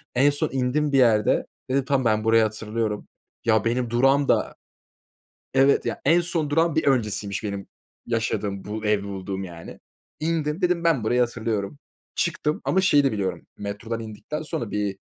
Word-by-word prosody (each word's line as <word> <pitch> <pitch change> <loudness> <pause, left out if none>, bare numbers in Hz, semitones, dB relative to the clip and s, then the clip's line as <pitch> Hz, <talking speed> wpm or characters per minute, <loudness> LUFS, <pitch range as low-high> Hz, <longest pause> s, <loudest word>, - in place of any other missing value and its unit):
En 140 +3 +5
son 145 - 0
indim 135 +3 0
bir 135 - +3
yerde, 110 -5 +3 0.2
dedim, 135 0 +1
"Tamam, 135 -3 +1
ben 110 -1 +2
burayı 115 0 +5
hatırlıyorum." 110 0 -2 0.4
Ya 110 -1 +3
benim 120 0 0
durağım 135 +4 +3
da - - +1 1.0
Evet 135 +1 +4
ya, - - -2
en 165 +5 +5
son 165 -4 -1
durağın 165 +1 +2
bir 160 - +2
öncesiymiş, 105 -6 0
benim 100 -2 -4 0.4
yaşadığım, 105 -4 -2
bu 110 +1 -5
evi 105 -1 +2
bulduğum 95 -1 -5
yani. 85 -2 -10 0.4
İndim, 160 +1 -1
dedim, 175 -1 +1
"Ben 145 -10 +2
burayı 125 +2 +2
hatırlıyorum," 115 0 -1 0.4
çıktım 155 -2 0
ama 190 - +2
şeyi 145 -6 +4
de 135 - +2
biliyorum, 95 -5 -3
metrodan 105 +3 -4
indikten 115 +8 -6
sonra 120 -7 -4
bir 100 -2 -2
115 Hz, 165 wpm, -24 LUFS, 105-145 Hz, 1.0 s, En